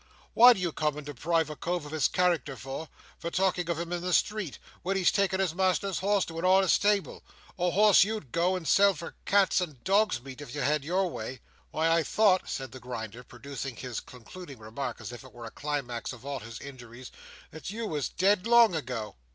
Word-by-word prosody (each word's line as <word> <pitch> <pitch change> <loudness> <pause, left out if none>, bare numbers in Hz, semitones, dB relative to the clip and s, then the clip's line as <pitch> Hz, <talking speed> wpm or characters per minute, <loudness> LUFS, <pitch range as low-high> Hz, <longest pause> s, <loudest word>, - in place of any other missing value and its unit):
What 245 +2 +9
do 195 - -6
you 175 -2 -1
come 150 -1 -1
and 150 - -7
deprive 155 +3 -1
a - - -6
cove 175 0 -3
of 145 - -9
his 155 -5 +2
character 170 -6 0
for, 135 +6 -7 0.3
by 170 - -3
talking 180 0 +1
to 170 - 0
him 170 +2 -4
in 175 - -2
the 180 0 -2
streets, 210 -7 0 0.2
when 195 +2 -1
he's 185 - +3
taking 195 -1 +1
his 190 -4 +1
master's 190 +1 0
horse 200 0 +2
to 165 0 -7
a - - -5
honest 190 0 +5
stable—a 200 -3 -1
horse 205 +2 +6
you'd 210 - -4
go 175 +2 +1
and 175 -4 -5
sell 200 -1 +5
for 165 +2 -8
cats' 200 -2 +3
and 150 -8 -6
dogs' 200 - +2
meat 135 +1 -9
if 140 -3 -8
you 145 - -2
had 150 +2 +1
your 185 +5 +1
way! 130 -5 -6 0.3
Why, 160 +1 +1
I 165 0 +4
thought," 190 +2 +2
said 135 -1 -4
the 130 - -10
Grinder, 120 -1 -7
producing 135 0 -7
his 125 0 -5
concluding 135 +5 -11
remark 115 +3 -6
as 110 - -7
if 120 - -9
it 130 - -15
were 120 -1 -9
the 115 - -8
climax 135 -5 -4
of 125 +1 -13
all 140 -1 -3
his 115 0 -9
injuries, 125 -2 -10 0.4
"that 160 - -8
you 225 +3 -4
was 150 -9 -2
dead 195 +2 +2
long 235 -4 +6
ago!" 120 - -4
160 Hz, 215 wpm, -28 LUFS, 130-185 Hz, 0.4 s, What